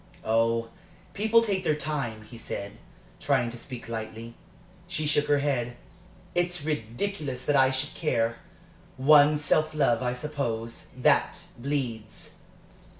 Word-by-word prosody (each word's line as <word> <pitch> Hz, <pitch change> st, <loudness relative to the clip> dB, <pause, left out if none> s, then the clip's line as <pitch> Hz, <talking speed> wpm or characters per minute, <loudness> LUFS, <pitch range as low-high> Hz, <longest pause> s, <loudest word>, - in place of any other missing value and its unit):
"Oh, 115 Hz, +1 st, +2 dB, 0.4 s
people 220 Hz, +3 st, +4 dB
take 195 Hz, -4 st, 0 dB
their 155 Hz, -, +2 dB
time," 140 Hz, -8 st, -3 dB
he 110 Hz, +2 st, -13 dB
said, 100 Hz, -3 st, -6 dB, 0.4 s
trying 120 Hz, -1 st, +1 dB
to 120 Hz, -, -8 dB
speak 125 Hz, -2 st, -8 dB
lightly. 115 Hz, 0 st, -6 dB, 0.5 s
She 155 Hz, -3 st, -2 dB
shook 150 Hz, 0 st, +3 dB
her 145 Hz, -, +4 dB
head. 130 Hz, -4 st, -1 dB, 0.6 s
"It's 175 Hz, -3 st, 0 dB
ridiculous 140 Hz, -, -3 dB
that 145 Hz, -, +2 dB
I 135 Hz, -1 st, +6 dB
should 135 Hz, +2 st, -2 dB
care. 115 Hz, -7 st, 0 dB, 0.6 s
One's 145 Hz, +2 st, +6 dB
self 155 Hz, +1 st, +2 dB
love, 130 Hz, -6 st, +3 dB
I 125 Hz, -1 st, 0 dB
suppose 125 Hz, -5 st, -4 dB
that -, -, +3 dB, 0.2 s
bleeds! 120 Hz, -5 st, -3 dB
135 Hz, 130 wpm, -27 LUFS, 115-150 Hz, 0.6 s, I